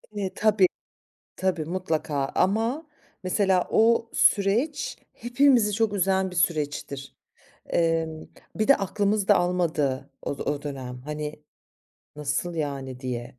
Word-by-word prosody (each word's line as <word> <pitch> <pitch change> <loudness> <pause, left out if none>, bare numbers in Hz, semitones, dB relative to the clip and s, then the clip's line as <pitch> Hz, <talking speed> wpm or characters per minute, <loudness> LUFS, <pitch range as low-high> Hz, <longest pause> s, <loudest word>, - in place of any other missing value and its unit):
E, 195 -2 -3
tabii, 210 -3 +4 0.7
tabii 185 -4 -1
mutlaka 155 -5 -2
ama 225 - +1 0.4
mesela 185 -1 +2
o 230 +1 +3
süreç 225 +9 +2 0.2
hepimizi 245 -3 +3
çok 220 0 +1
üzen 190 -1 +1
bir - - -9
süreçtir. 145 -4 -1 0.5
Emm, 165 -1 0 0.3
bir 215 +2 0
de 280 - +7
aklımız 200 +1 0
da 205 - +6
almadığı 160 -7 0
o 140 - -4
d - - -7
o 145 -1 -2
dönem. 130 -4 -6
Hani, 150 0 -5 0.7
"Nasıl 150 +4 -2
yani?" 135 -5 -4
diye. 125 -1 -5
180 Hz, 120 wpm, -26 LUFS, 150-205 Hz, 0.7 s, de